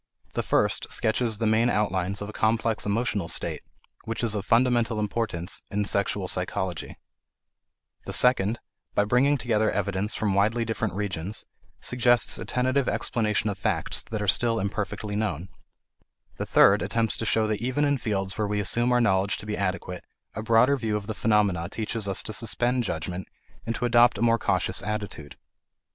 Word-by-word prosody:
The - - -1
first - - 0
sketches 110 0 +1
the 115 - -1
main 110 +2 +3
outlines 100 -3 0
of 105 - -7
a - - -8
complex 110 0 0
emotional 105 -3 -1
state - - -2 0.4
which 115 +1 -4
is 115 -2 +2
of 100 -2 -4
fundamental 120 -2 +2
importance 105 -5 -2
in 105 0 -1
sexual 100 -1 -1
psychology; 90 0 -3 1.1
the - - -3
second, 120 -3 +3 0.4
by 105 - +4
bringing 135 +6 +3
together 110 -3 +1
evidence 100 +1 -1
from 105 -3 0
widely 110 +4 +2
different 110 -4 -2
regions, 100 -1 -3 0.4
suggests 120 -1 +3
a - - -5
tentative 130 +1 0
explanation 110 -2 -1
of 100 - -8
facts 100 -6 0
that 110 -2 -3
are - - -3
still 115 +3 +2
imperfectly 105 +1 -3
known; 95 -5 -2 0.9
the - - -4
third - - +5
attempts 115 -1 0
to 115 - -3
show 110 0 +2
that 110 -1 -2
even 130 +4 0
in 145 -2 +1
fields 95 -3 -3
where 105 - +1
we 105 0 -1
assume 120 +5 +2
our 125 0 +3
knowledge 100 -3 +2
to - - -9
be 105 0 -3
adequate 90 -2 -3 0.3
a 110 - -4
broader 115 +5 +4
view 110 -4 -1
of 105 - -7
the 110 - -4
phenomena 100 -6 +1
teaches 110 -1 -2
us 95 - +2
to 110 - -5
suspend 120 +3 +1
judgment 90 -1 -4 0.4
and 115 - -1
to 125 - -2
adopt 120 -1 +5
a - - -5
more 115 0 +3
cautious - - 0
attitude. 105 -8 -5
105 Hz, 175 wpm, -26 LUFS, 100-115 Hz, 1.1 s, third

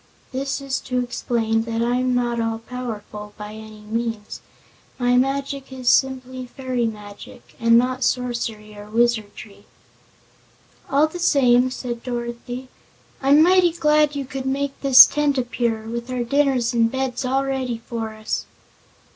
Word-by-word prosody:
This 275 +2 -2
is 275 -1 -2
to 255 -1 -4
explain 225 -2 -1
that 230 0 -1
I'm 250 +1 +1
not 240 -1 0
all 225 0 -1
powerful, 220 -3 -7
by 210 0 -8
any 215 -1 -11
means. 225 0 -4 0.6
My 245 0 +2
magic 275 +1 -1
is 255 -2 -1
simply 260 -1 +1
fairy 250 -2 -2
magic, 205 -2 -10
and 230 0 +5
not 255 +2 +1
sorcery 235 -4 -2
or 205 0 -11
wizardry." 220 -3 -1 1.2
"All 285 +2 +4
the 315 +3 -6
same," 255 -6 +4
said 245 -2 -5
Dorothy, 245 +1 -5 0.5
"I'm 285 +3 +6
mighty 360 -1 +4
glad 300 -2 +2
you 280 -1 -3
could 265 0 -5
make 275 +1 -1
this 270 -1 +10
tent 290 -1 0
appear, 240 -3 -1
with 235 +2 -6
our 250 -1 -2
dinners 260 -2 +1
and 230 -1 +2
beds 265 -1 -2
all 265 +2 0
ready 260 -3 -2
for 225 -2 -4
us." 215 0 -4
245 Hz, 145 wpm, -22 LUFS, 230-265 Hz, 1.2 s, this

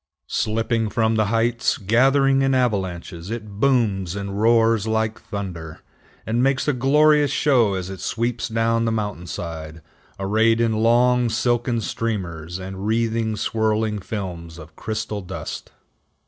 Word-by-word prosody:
Slipping 110 0 -1
from 110 +2 +1
the 110 -1 +2
heights, 115 +2 +1
gathering 135 +6 +3
in 135 0 +2
avalanches, 95 -7 -2
it 105 -3 -6
booms 105 -9 +1
and 100 0 -4
roars 115 -1 +3
like 110 0 -1
thunder, 95 -8 -6 0.4
and 115 +2 0
makes 135 +1 +1
a 145 - +3
glorious 145 +3 +4
show 120 -8 +2
as 95 0 -4
it 95 - -8
sweeps 115 0 -2
down 115 +1 +1
the 115 - +1
mountain 105 -5 -3
side, 80 -2 -6 0.4
arrayed 110 +4 +2
in 115 -1 +2
long, 120 +2 +3
silken 120 0 0
streamers 90 -8 -3
and 95 +1 -6
wreathing, 115 0 0
swirling 110 0 0
films 90 -6 -6
of 80 -1 -12
crystal 110 -1 -4
dust. 95 0 -7
110 Hz, 135 wpm, -22 LUFS, 95-115 Hz, 0.4 s, glorious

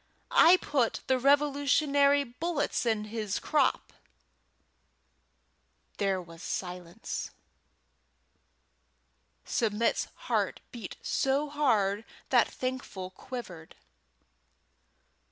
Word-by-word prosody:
"I 345 +3 +7
put 270 -9 0
the 260 -1 +2
Revolutionary 285 +1 +3
bullets 290 0 -2
in 220 -2 +1
his 215 -2 -3
crop." 295 -4 +1 2.0
There 195 -2 +1
was 165 -2 -11
silence. 180 -2 -5 2.2
Submit's 225 0 0 0.2
heart - - 0
beat 230 -6 -7
so 280 +2 0
hard 220 -8 +2 0.3
that - - +5
Thankful 255 -8 -5
quivered. 185 -7 -8
245 Hz, 75 wpm, -29 LUFS, 200-285 Hz, 2.2 s, I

